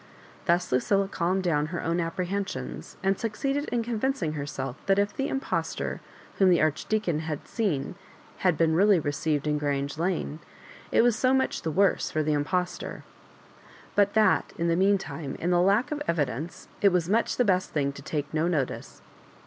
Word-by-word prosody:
Thus 180 0 +1
Lucilla 195 +10 +2
calmed 185 0 0
down 150 -4 +1
her 170 +2 -4
own 165 +1 0
apprehensions, 170 - -4
and 195 0 +1
succeeded 275 +6 -1
in 240 -5 -1
convincing 230 - -1
her 145 -2 -4
self 135 -2 -5
that 195 0 +4
if 205 0 +1
the 270 - -1
impostor 270 -1 -2 0.4
whom 190 -1 +6
the 175 - +5
Archdeacon 165 +2 0
had 155 -2 -5
seen 180 - -1 0.4
had 180 -5 +2
been 165 -1 +3
really 195 +2 +5
received 145 0 -1
in 150 -1 +1
Grange 140 0 -2
Lane, 170 -3 -1 0.5
it - - +5
was 240 -2 +4
so 255 +2 +3
much 265 - 0
the 160 - -2
worse 195 +5 +2
for 155 - 0
the 150 0 +1
impostor; 180 +5 -2 0.9
but 205 0 +3
that, 220 -1 +3
in 170 0 0
the 165 - +3
meantime, 170 -7 0
in 175 - -1
the 175 0 +4
lack 205 +10 +3
of 300 -1 -2
evidence 150 0 -2
it 200 - +6
was 175 -2 +1
much 220 +5 +1
the 245 - +3
best 185 -4 +1
thmg 140 -2 +1
to 140 - -10
take 145 +1 -4
no 155 +2 +1
notice. 150 -7 -3
175 Hz, 180 wpm, -27 LUFS, 150-200 Hz, 0.9 s, whom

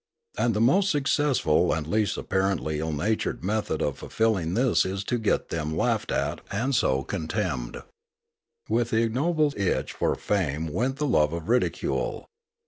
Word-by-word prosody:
And 115 -3 +1
the - - +1
most 185 +12 +4
successful 135 - +2
and 80 -2 -2
least 105 +4 0
apparently 95 -5 -1
ill 80 +1 -2
natured 100 +9 -1
method 105 -4 -1
of 70 -2 -2
fulfilling 95 -7 0
this 125 +1 +3
is 95 +1 -3
to 120 +4 -1
get 110 - 0
them 80 -1 -3
laughed - - 0
at - - -1
and 120 +7 -1
so 70 - +2
con 80 +1 -4
temned. 80 - -3 0.8
With 115 +1 +1
the 115 0 +2
ignoble 145 +6 +1
itch 100 -2 -1
for - - 0
fame 80 -6 -1
went 125 +8 0
the 150 - -2
love 75 - +2
of 85 +3 -5
ridicule. 450 - 0
105 Hz, 160 wpm, -26 LUFS, 80-125 Hz, 0.8 s, most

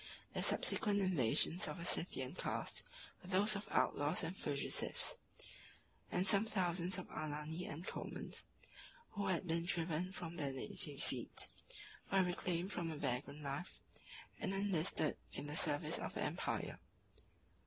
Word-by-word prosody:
The - - -2
subsequent 205 -2 +3
invasions 175 - +4
of 150 - -5
a 170 - -6
Scythian 140 -7 0
cast - - -2 0.4
were 185 - -12
those 205 +3 +3
of 200 - -6
outlaws 145 +5 +1
and 165 +3 -4
fugitives: 145 -6 0 0.9
and 180 +1 +1
some 200 +1 +9
thousands 180 -4 +1
of 185 - -7
Alani 155 +3 -5
and 160 +4 -7
Comans, - - -3 0.6
who 200 -2 -3
had 185 -2 0
been 165 -1 -1
driven 170 0 -2
from 170 -3 -7
their 140 -4 -2
native 135 - -3
seats, - - +3 0.6
were 195 -1 +4
reclaimed 180 +1 -2
from 170 -4 -3
a 155 - -5
vagrant 140 +2 -3
life, 140 +6 -5 0.6
and 195 -3 -1
enlisted 185 -5 +2 0.2
in - - -5
the 145 +1 -5
service 150 -3 +4
of - - -6
the - - -2
empire. - - -3
175 Hz, 145 wpm, -38 LUFS, 150-190 Hz, 0.9 s, some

